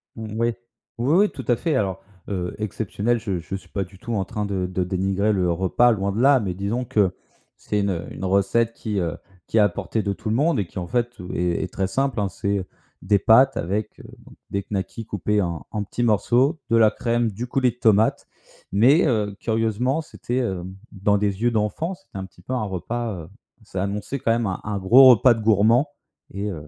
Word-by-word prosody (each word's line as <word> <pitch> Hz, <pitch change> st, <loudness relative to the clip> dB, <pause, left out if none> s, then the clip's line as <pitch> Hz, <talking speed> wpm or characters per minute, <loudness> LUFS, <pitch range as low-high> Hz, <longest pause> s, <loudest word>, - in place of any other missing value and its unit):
Mmh, 110 Hz, -2 st, -7 dB
oui, 115 Hz, 0 st, +1 dB, 0.4 s
oui, 125 Hz, +6 st, +1 dB
oui, 205 Hz, +3 st, +5 dB
tout 130 Hz, -, -9 dB
à 120 Hz, -, +4 dB
fait. 160 Hz, +5 st, -1 dB
Alors, 95 Hz, -7 st, -1 dB, 0.3 s
heu, 90 Hz, -3 st, -3 dB
«exceptionnel», 110 Hz, +2 st, -1 dB
je 100 Hz, -6 st, -3 dB
je 90 Hz, -, -6 dB
suis 95 Hz, -, -10 dB
pas 100 Hz, -, -2 dB
du 95 Hz, +1 st, -14 dB
tout 120 Hz, +4 st, -5 dB
en 100 Hz, -3 st, 0 dB
train 105 Hz, +3 st, -3 dB
de, 95 Hz, -2 st, -2 dB
de 90 Hz, 0 st, -2 dB
dénigrer 95 Hz, +3 st, 0 dB
le 90 Hz, -3 st, +1 dB
repas, 95 Hz, +8 st, +3 dB
loin 100 Hz, -3 st, -1 dB
de 100 Hz, -, -3 dB
là, 135 Hz, 0 st, +6 dB
mais 95 Hz, -5 st, -2 dB
disons 100 Hz, +7 st, -2 dB
que 100 Hz, -5 st, +2 dB, 0.4 s
c'est 105 Hz, -, -2 dB
une, 100 Hz, 0 st, 0 dB
heu, 85 Hz, -2 st, -4 dB
une 95 Hz, -, -5 dB
recette 100 Hz, +5 st, +2 dB
qui, 105 Hz, -3 st, -3 dB
heu, 85 Hz, -3 st, -2 dB, 0.3 s
qui -, -, -1 dB
est -, -, +7 dB
à 105 Hz, -, +5 dB
portée 100 Hz, +4 st, -3 dB
de 100 Hz, -, -1 dB
tout 110 Hz, -, -6 dB
le 110 Hz, -, +1 dB
monde 150 Hz, 0 st, +2 dB
et 100 Hz, -, 0 dB
qui, -, -, -7 dB
en 90 Hz, -, -5 dB
fait, 120 Hz, +3 st, 0 dB
heu, 90 Hz, 0 st, -8 dB
est 90 Hz, +1 st, -1 dB
très 95 Hz, -, -1 dB
simple, 135 Hz, +3 st, -1 dB
hein. 100 Hz, -2 st, 0 dB
C'est 100 Hz, -1 st, -2 dB, 0.4 s
des 100 Hz, +2 st, +3 dB
pâtes 130 Hz, +7 st, +5 dB
avec, 100 Hz, +5 st, -3 dB
heu, -, -, -12 dB, 0.5 s
des 100 Hz, 0 st, -1 dB
knackis 100 Hz, +3 st, -4 dB
coupés 105 Hz, 0 st, 0 dB
en 85 Hz, -6 st, -3 dB
en 105 Hz, -2 st, -2 dB
petits 120 Hz, +4 st, -3 dB
morceaux, 120 Hz, +7 st, +2 dB
de 115 Hz, -, +4 dB
la 110 Hz, -2 st, +5 dB
crème, 120 Hz, -1 st, 0 dB
du 120 Hz, +6 st, -5 dB
coulis 125 Hz, 0 st, +1 dB
de -, -, -20 dB
tomate. 110 Hz, -2 st, +2 dB, 0.4 s
Mais, 130 Hz, -, +5 dB
heu, 105 Hz, -6 st, 0 dB
curieusement, 115 Hz, +6 st, 0 dB
c'était, 130 Hz, -5 st, -4 dB
heu, 95 Hz, -7 st, -2 dB, 0.3 s
dans 100 Hz, +1 st, +1 dB
des 100 Hz, 0 st, -1 dB
yeux 120 Hz, +1 st, +3 dB
d'enfants, 110 Hz, -, -1 dB
c'était 190 Hz, -, -14 dB
un 95 Hz, -, -4 dB
petit 90 Hz, -1 st, -18 dB
peu 125 Hz, -, -6 dB
un 125 Hz, -, 0 dB
repas, 105 Hz, +4 st, -3 dB
heu, 80 Hz, -, -13 dB, 0.3 s
ça 95 Hz, -3 st, -4 dB
annonçait 105 Hz, +7 st, -3 dB
quand 115 Hz, -, +1 dB
même 115 Hz, 0 st, +1 dB
un 95 Hz, -, -3 dB
un 105 Hz, -1 st, -3 dB
gros 125 Hz, +8 st, +8 dB
repas 125 Hz, +1 st, +6 dB
de 110 Hz, -, -6 dB
gourmand. 110 Hz, +6 st, +3 dB, 0.4 s
Et 100 Hz, +2 st, -3 dB
heu 75 Hz, -6 st, -7 dB
105 Hz, 225 wpm, -23 LUFS, 95-120 Hz, 0.5 s, gros